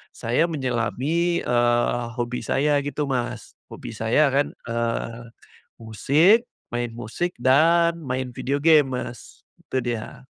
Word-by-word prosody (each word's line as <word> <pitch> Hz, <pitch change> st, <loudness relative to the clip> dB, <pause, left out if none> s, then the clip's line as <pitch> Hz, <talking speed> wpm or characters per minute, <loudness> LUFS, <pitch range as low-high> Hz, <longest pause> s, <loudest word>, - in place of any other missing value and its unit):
saya 120 Hz, +9 st, +1 dB
menyelami, 145 Hz, +5 st, -1 dB
eee, 120 Hz, 0 st, +1 dB
hobi 120 Hz, 0 st, -2 dB
saya 145 Hz, +1 st, +2 dB
gitu 145 Hz, +1 st, -2 dB
Mas 120 Hz, -4 st, -3 dB
hobi -, -, -9 dB
saya 115 Hz, +7 st, +2 dB
kan, 140 Hz, +1 st, +1 dB, 0.2 s
eee, 115 Hz, 0 st, -2 dB, 0.6 s
musik, 155 Hz, -, +3 dB, 0.3 s
main 120 Hz, -1 st, -2 dB
musik 120 Hz, +10 st, -4 dB
dan 165 Hz, +6 st, +3 dB
main 130 Hz, -1 st, -3 dB
video 135 Hz, +2 st, -1 dB
game 150 Hz, -2 st, +5 dB
Mas, 120 Hz, -1 st, -9 dB, 0.2 s
itu -, -, -1 dB
dia. 120 Hz, +2 st, -5 dB
130 Hz, 120 wpm, -23 LUFS, 120-150 Hz, 0.6 s, game